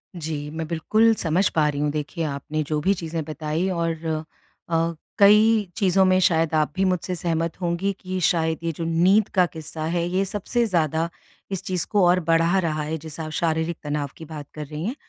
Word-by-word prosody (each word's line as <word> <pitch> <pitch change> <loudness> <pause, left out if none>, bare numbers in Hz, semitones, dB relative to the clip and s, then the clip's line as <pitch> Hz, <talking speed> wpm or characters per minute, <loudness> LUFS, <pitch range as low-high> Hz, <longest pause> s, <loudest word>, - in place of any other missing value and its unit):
जी, 155 -3 -4
मैं 160 +1 -4
बिल्कुल 215 +8 +3
समझ 180 +1 +1
पा 155 -2 +4
रही 145 -1 -3
हूँ। 150 - +1
देखिए 150 +3 -3
आपने 150 +1 -3
जो 150 0 0
भी 190 +6 +3
चीज़ें 165 -3 -4
बताई 155 +3 -2
और 165 -2 -2 0.7
अ, 165 0 +1 0.2
कई 210 0 +5
चीज़ों 195 -2 +3
में 185 0 +4
शायद 165 -4 +2
आप 155 -1 +2
भी 190 - +1
मुझसे 180 0 -1
सहमत 165 0 -2
होंगी 175 +3 0
कि 185 0 -4
शायद 160 -3 +1
ये 165 - 0
जो 165 +1 -6
नींद 185 +6 +3
का 180 -2 +5
किस्सा 160 -1 -7
है 170 +1 0
ये 185 +2 +1
सबसे 210 +5 -1
ज़्यादा 165 -4 0 0.4
इस 195 - -3
चीज़ 180 -2 -2
को 205 -4 +4
और 180 +1 +4
बढ़ा 165 +3 +3
रहा 155 -4 -1
है 155 +2 -3
जिससे 160 +1 -8
आप 155 - -6
शारीरिक 160 0 0
तनाव 145 -1 -2
की 160 - -9
बात 150 -2 -8
कर 150 -1 -6
रही 150 +2 -6
हैं। 240 +6 -2
165 Hz, 205 wpm, -24 LUFS, 155-185 Hz, 0.7 s, कई